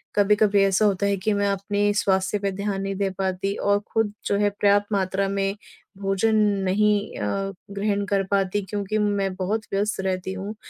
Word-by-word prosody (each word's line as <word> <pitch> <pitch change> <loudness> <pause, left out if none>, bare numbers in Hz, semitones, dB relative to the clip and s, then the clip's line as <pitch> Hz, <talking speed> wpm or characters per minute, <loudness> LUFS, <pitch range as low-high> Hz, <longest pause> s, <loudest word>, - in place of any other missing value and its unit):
कभी-कभी 205 0 +4
ऐसा 195 +2 +3
होता 200 -1 +1
है 200 0 +1
कि 205 +3 0
मैं 205 0 +1
अपने 205 +1 0
स्वास्थ्य 190 0 +1
पे 200 -1 -1
ध्यान 200 0 -3
नहीं 195 0 -3
दे 195 0 0
पाती 190 0 -1
और 200 0 +1
खुद 225 -2 +1
जो 200 - +1
है 205 0 +2
पर्याप्त 205 0 +2
मात्रा 195 0 0
में 195 0 -1 0.4
भोजन 195 +3 +1 0.3
नहीं 210 +2 +1
अ, 195 0 -2 0.2
ग्रहण 200 0 -1
कर 200 -1 +1
पाती 200 0 +1
क्योंकि 205 0 -2
मैं 200 -2 0
बहुत 195 +4 -1
व्यस्त 205 +1 0
रहती 190 0 -2
हूँ। 195 +3 -6
200 Hz, 180 wpm, -24 LUFS, 195-205 Hz, 0.4 s, कभी-कभी